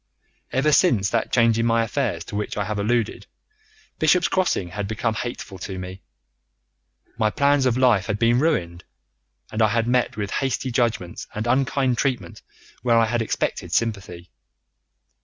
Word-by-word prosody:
"Ever 145 +4 +2
since 115 - +3
that - - 0
change 115 -2 +3
in 115 - +1
my 115 0 +3
affairs 110 -7 -2
to - - -9
which 105 0 -3
I 105 - 0
have 105 0 -3
alluded, 115 +2 -1 0.7
Bishop's 160 +3 +3
Crossing 180 - 0
had 100 +3 -4
become 110 +2 -1
hateful 110 -4 -6
to 95 +1 -6
me. 95 +1 -7 1.2
My 110 - +3
plans 140 +2 +2
of 125 -1 +1
life 120 -7 +3
had 105 -2 -1
been 115 +2 +3
ruined, 90 - 0 0.7
and 110 - -2
I 110 - +6
had 115 +2 0
met 125 -2 +1
with 100 -2 -3
hasty 135 -1 -1
judgments 115 -8 -1
and 110 +1 -3
unkind 130 0 +1
treatment 130 -4 -2 0.4
where 120 -2 +3
I 115 - +5
had 120 +1 -1
expected 115 - -2
sympathy. 100 -6 -2
115 Hz, 160 wpm, -23 LUFS, 105-125 Hz, 1.2 s, I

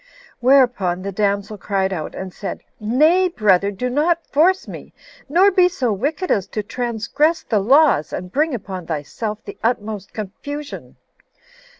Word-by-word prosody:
Whereupon 240 -9 +3
the 200 - -3
damsel 200 +1 -1
cried 195 0 -1
out, 155 -4 -5
and 190 -1 -6
said, 200 - -6 0.2
"Nay, 310 - +3
brother, 200 - +2
do 205 +5 -3
not 320 +6 +1
force 360 +6 +2
me, - - -10 0.4
nor 370 +7 +5
be 365 -1 +4
so 255 - -1
wicked 295 - -2
as 195 -2 +1
to 215 - -4
transgress 245 +8 -1
the 215 - +1
laws, 265 - +4
and 180 0 -6
bring 300 +2 +1
upon 190 -5 -7
thyself 205 +8 -4
the - - -9
utmost 215 -4 -2
confusion. 285 +8 -7
225 Hz, 150 wpm, -20 LUFS, 195-295 Hz, 0.4 s, nor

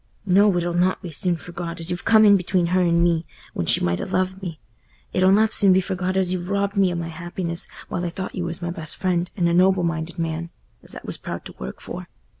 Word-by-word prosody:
"No, 195 0 +4
it'll 175 0 -1
not 180 +2 +1
be 175 - -6
soon 175 +3 -1
forgot, 170 0 -7
as 165 +1 -4
you've 175 - -4
come 220 -1 +6
in 205 -1 +7
between 180 -1 +1
her 185 - +4
and 170 -1 +3
me, 170 -1 +2 0.3
when 85 - -3
she - - +5
might 85 0 0
ha' - - -5
loved 185 +1 0
me—it'll 175 +3 -3
not 215 +2 +4
soon 195 -2 +5
be 185 - +5
forgot 185 0 -2
as 185 -1 +2
you've 180 0 -4
robbed 200 0 0
me 195 -2 +3
o' - - -3
my 170 -1 -3
happiness, 170 +1 -4 0.2
while 175 - -3
I 175 - -1
thought 185 +2 -6
you 180 - -3
was 170 +1 -5
my 175 - -2
best 160 -2 -3
friend, 180 -2 0
and 175 -3 +2
a 170 - +1
noble 185 +1 +4
minded 165 +1 -2
man, 165 0 -3 0.3
as - - -6
I - - -7
was - - -6
proud - - -6
to - - -9
work - - -6
for. - - -7
175 Hz, 245 wpm, -23 LUFS, 170-185 Hz, 0.3 s, in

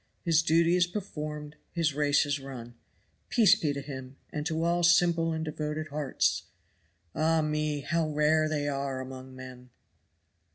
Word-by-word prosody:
His 165 -2 +4
duty 165 +1 +3
is 180 -1 +3
performed, 150 -6 -6 0.2
his 165 -4 +1
race 145 0 +3
is 145 0 -1
run. 125 -3 -9 0.6
Peace 225 -6 +6
be 150 - 0
to 140 0 -4
him, 135 -1 -8
and 150 0 -3
to 160 -1 -1
all 170 +1 +2
simple 170 -1 +4
and 160 0 -2
devoted 155 0 -4
hearts. 145 -2 0 0.7
Ah 160 0 +2
me! 150 -1 -1
how 165 +1 0
rare 155 +1 +2
they 145 -2 -1
are 140 -2 -2
among 130 0 -8
men! 130 -1 -11
150 Hz, 155 wpm, -29 LUFS, 140-165 Hz, 0.7 s, Peace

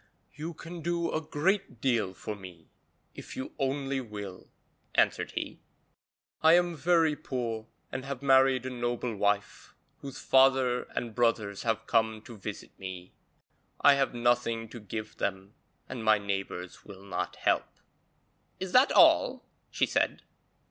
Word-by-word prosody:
'You 160 +3 -6
can 170 +2 -8
do 170 +1 -1
a 155 - -1
great 175 - -1
deal 115 -7 +1
for 105 +5 -5
me 90 -5 -13 0.4
if - - -9
you 130 - -5
only 135 0 -1
will,' 105 -5 -8 0.5
answered - - +2
he. - - -4 0.8
'I 160 +1 +7
am 175 -1 +3
very 165 -1 +3
poor 120 -6 -4 0.2
and 130 - -4
have 140 -1 -5
married 135 -2 +5
a 130 - -3
noble 120 -1 -2
wife, 105 0 -1 0.2
whose 135 -2 -8
father 130 -2 +4
and 115 -2 -3
brothers 110 -4 +1
have 110 -1 -1
come 110 -2 +1
to 120 -1 -10
visit 100 - -7
me. 95 -1 -8 0.7
I 145 - +7
have 135 -2 +1
nothing 120 -2 +1
to 120 - -9
give 110 +1 -6
them, 95 +1 -3 0.3
and 120 -3 -6
my 110 -1 +5
neighbours 95 -3 -4
will 100 -2 -12
not 100 - -3
help.' - - 0 0.8
'Is 190 -1 -4
that 255 +3 +6
all?' - - +5 0.2
she - - +1
said. - - 0
120 Hz, 145 wpm, -29 LUFS, 105-140 Hz, 0.8 s, I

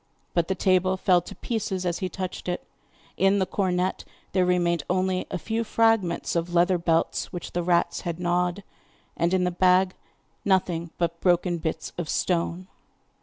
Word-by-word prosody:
But 170 -1 +1
the 190 - 0
table 185 0 +2
fell 180 -1 +3
to - - -10
pieces 215 -5 -3
as 175 -1 -1
he 185 - -2
touched 185 +1 -5
it, 180 - -2 0.5
in 195 +1 +4
the 190 - +2
cornet 185 -1 -1 0.3
there 185 -1 +2
remained 175 -2 +2
only 185 0 0
a - - -2
few 225 +5 -2
fragments 225 -8 +1
of 170 +1 -1
leathern 175 +1 +4
belts 165 -1 0
which 175 - -6
the 175 - -1
rats 170 0 +1
had 170 -2 -4
gnawed, 180 +2 0 0.5
and 170 +1 +1
in 185 -1 +2
the 180 - +1
bag 185 +1 +3 0.5
nothing 180 -4 +1
but 170 -1 -1
broken 175 -1 +2
bits 160 -1 -4
of 165 -3 -3
stone. 175 0 0
180 Hz, 170 wpm, -26 LUFS, 175-190 Hz, 0.5 s, in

